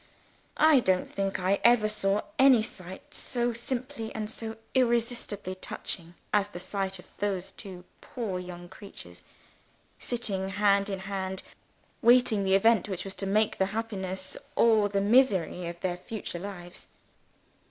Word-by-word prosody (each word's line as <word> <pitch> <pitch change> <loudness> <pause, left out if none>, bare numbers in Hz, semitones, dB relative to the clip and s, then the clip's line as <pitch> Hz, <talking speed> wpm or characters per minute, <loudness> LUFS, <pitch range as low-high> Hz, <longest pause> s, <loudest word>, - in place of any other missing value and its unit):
I 310 -2 +6
don't 185 -6 +2
think 195 0 -2
I 190 +2 +2
ever 235 -3 +6
saw 205 -1 +1 0.2
any 260 -4 +7
sight 190 +7 -9
so 240 -1 -1
simply 240 0 -4
and 220 0 -3 0.4
irresistibly 235 -6 0
touching 175 -2 -6 0.2
as 205 -1 +3
the 190 -4 -8
sight 195 +1 -2
of 180 - -16
those 195 -3 -2
two 185 -3 -10 0.2
poor 215 -7 -4
young 175 -1 -8
creatures 180 - -11 0.8
sitting 200 -6 -2
hand 200 0 +3
in 195 -1 -3
hand, 190 -1 -4 0.6
waiting 235 -3 +5
the 190 0 +3
event 210 0 +4
which 185 -1 -4
was 195 - -4
to 195 - -3
make 215 +2 +1
the 190 - +3
happiness 190 -4 -4 0.2
or 220 -3 +4
the 200 0 +1
misery 200 -6 +3
of 170 0 -6
their 180 -2 -1
future 185 -2 -6
lives. 180 -2 -7
200 Hz, 140 wpm, -28 LUFS, 185-225 Hz, 0.8 s, any